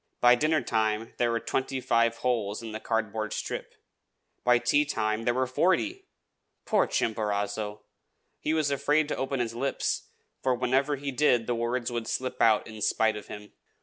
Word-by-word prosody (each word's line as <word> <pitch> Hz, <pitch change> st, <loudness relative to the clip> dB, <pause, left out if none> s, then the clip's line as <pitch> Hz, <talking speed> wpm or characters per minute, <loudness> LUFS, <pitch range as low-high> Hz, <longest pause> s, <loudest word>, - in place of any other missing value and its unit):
By 120 Hz, 0 st, +7 dB
dinnertime 115 Hz, -6 st, +1 dB
there 120 Hz, -, +2 dB
were 115 Hz, 0 st, 0 dB
twenty 135 Hz, +2 st, -2 dB
five 115 Hz, -2 st, +2 dB
holes 110 Hz, -3 st, 0 dB
in 115 Hz, -, -6 dB
the 110 Hz, -, -5 dB
cardboard 110 Hz, -1 st, -2 dB
strip; -, -, -5 dB, 0.7 s
by 125 Hz, 0 st, +5 dB
tea 120 Hz, +5 st, +3 dB
time 110 Hz, -6 st, -1 dB
there 120 Hz, -, +3 dB
were 130 Hz, 0 st, +2 dB
forty! 305 Hz, -, 0 dB, 0.6 s
Poor 210 Hz, -3 st, +3 dB
Chimborazo! 105 Hz, -1 st, -1 dB, 0.6 s
he 155 Hz, -, -1 dB
was 155 Hz, -3 st, +1 dB
afraid 145 Hz, +2 st, +2 dB
to -, -, -1 dB
open 135 Hz, 0 st, -2 dB
his 115 Hz, -2 st, -1 dB
lips, 135 Hz, +3 st, -2 dB, 0.3 s
for 130 Hz, -1 st, +2 dB
whenever 130 Hz, +4 st, +1 dB
he 140 Hz, 0 st, -4 dB
did 125 Hz, -4 st, +3 dB
the 120 Hz, -, 0 dB
words 120 Hz, +1 st, -1 dB
would 120 Hz, -1 st, -3 dB
slip 130 Hz, +1 st, -3 dB
out 110 Hz, -2 st, +4 dB
in 110 Hz, -1 st, -10 dB
spite 110 Hz, +1 st, +2 dB
of 105 Hz, -, -8 dB
him. 105 Hz, 0 st, -10 dB
120 Hz, 170 wpm, -28 LUFS, 110-135 Hz, 0.7 s, By